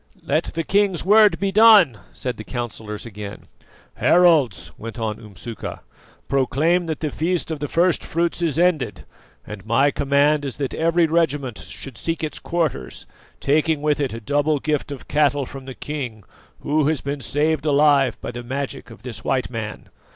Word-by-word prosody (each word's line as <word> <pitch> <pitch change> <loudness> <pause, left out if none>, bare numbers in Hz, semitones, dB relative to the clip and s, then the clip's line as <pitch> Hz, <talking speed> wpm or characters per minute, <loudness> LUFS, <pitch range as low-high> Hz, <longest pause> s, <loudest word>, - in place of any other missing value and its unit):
"Let 155 +4 +1
the 165 - -1
king's 195 0 +1
word 210 +1 +6
be 195 0 0
done," 205 - +7
said 125 -1 -4
the 110 - -7
councillors 110 -3 -6
again. 105 -2 -8 0.5
"Heralds," 150 - +3
went 115 +2 -8
on 110 -2 -3
Umsuka, 105 +1 -8 0.5
"proclaim 150 +6 +1
that 160 -2 -3
the 155 -2 -2
feast 170 +2 -1
of 155 - -3
the 145 - -3
first 170 +2 +2
fruits 170 +1 -1
is 160 -4 0
ended, 160 -10 +1 0.4
and 105 -2 -8
my 135 +6 +3
command 145 +2 +2
is 135 -3 -5
that 135 -2 -3
every 165 +1 +2
regiment 145 -7 0
should 135 -5 -8
seek 165 -1 -2
its 155 - -3
quarters, 160 - -2 0.3
taking 150 +1 +1
with 150 -1 +1
it 140 -3 0
a 115 - -6
double 145 +5 +1
gift 150 0 -2
of 140 - -8
cattle 145 -1 +2
from 135 +1 -10
the 130 -1 -8
king, 125 -8 -5 0.4
who 150 0 +1
has 155 -2 0
been 140 0 -4
saved 150 +4 0
alive 145 -2 +3
by - - -5
the 120 0 -6
magic 135 +2 -5
of - - -14
this 115 -4 -6
white 130 -1 -1
man. 110 -3 -6
145 Hz, 175 wpm, -22 LUFS, 125-160 Hz, 0.5 s, done